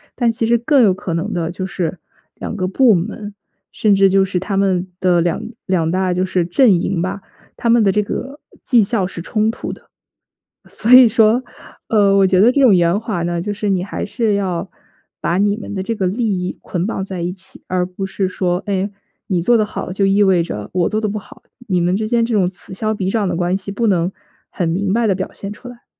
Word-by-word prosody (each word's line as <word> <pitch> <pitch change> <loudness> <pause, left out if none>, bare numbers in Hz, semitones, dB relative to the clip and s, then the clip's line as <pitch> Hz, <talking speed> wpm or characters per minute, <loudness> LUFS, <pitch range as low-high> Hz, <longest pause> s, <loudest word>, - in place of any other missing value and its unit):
但 235 -2 +2
其 225 0 -2
实 235 +1 +3
更 255 +3 +3
有 195 -4 +4
可 185 -3 -4
能 180 +6 -2
的 170 -2 -2
就 185 +2 -5
是 185 -2 -3 0.4
两 - - -6
个 185 -2 -1
部 230 +3 +4
门， 205 +3 -3 0.4
甚 210 -2 +2
至 195 0 +5
就 195 0 +3
是 185 -1 -1
他 195 +2 -3
们 190 -2 +1
的 180 -2 +3
两 170 +3 0 0.2
两 175 -4 0
大 185 +1 0
就 180 +1 0
是 185 -2 0
阵 225 +7 +4
营 180 -1 -1
吧， 190 +3 -3 0.4
他 235 - +1
们 235 -1 +5
的 195 - +3
这 210 +2 +1
个 275 +7 -6 0.2
绩 240 -4 +4
效 195 -2 0
是 180 - -8
冲 215 +2 0
突 230 - -5
的。 - - -16 0.8
所 225 - -2
以 250 -1 +10
说， 225 +2 +3 0.5
呃， 200 -3 +4
我 195 - +5
觉 185 -1 +3
得 225 +5 +6
这 280 +2 +1
种 230 -7 +6
圆 175 +3 +2
滑 220 -6 -3
呢， 170 0 -1
就 205 +4 -3
是 210 0 -2
你 185 -2 +1
还 200 - -5
是 220 0 -1
要 195 -2 -2 0.5
把 175 - 0
你 205 +1 +2
们 220 - -8
的 190 - -2
这 230 +4 -2
个 195 -4 -1
利 225 +6 -1
益 185 -3 -2
捆 180 +2 -3
绑 195 - -3
在 190 -2 -5
一 175 +1 -2
起， 190 0 -10
而 180 -1 0
不 185 +2 -5
是 190 0 -1
说， 180 0 -1
哎， 200 -1 -1 0.4
你 185 -3 0
做 235 +8 +3
得 220 - +3
好 210 -3 -5
就 195 +2 -1
意 200 +1 +3
味 185 -3 +3
着 105 -11 -5
我 180 -2 +1
做 215 - -1
得 215 - -1
不 210 +1 -3
好， - - -17 0.2
你 180 -3 +1
们 175 +2 +1
之 215 +2 -2
间 235 +1 +2
这 235 - -3
种 195 -4 +3
此 185 +1 -8
消 215 +2 -2
彼 190 -3 -3
长 210 -5 0
的 175 - -1
关 175 +1 0
系 195 +1 -5
不 230 +4 -1
能 185 -3 +1 0.4
很 175 - -2
明 190 +4 -1
白 230 +3 +1
地 200 - +3
表 190 0 -4
现 200 - -7
出 230 +4 -13
来。 245 -1 -12
195 Hz, 260 characters per minute, -18 LUFS, 180-215 Hz, 0.8 s, 以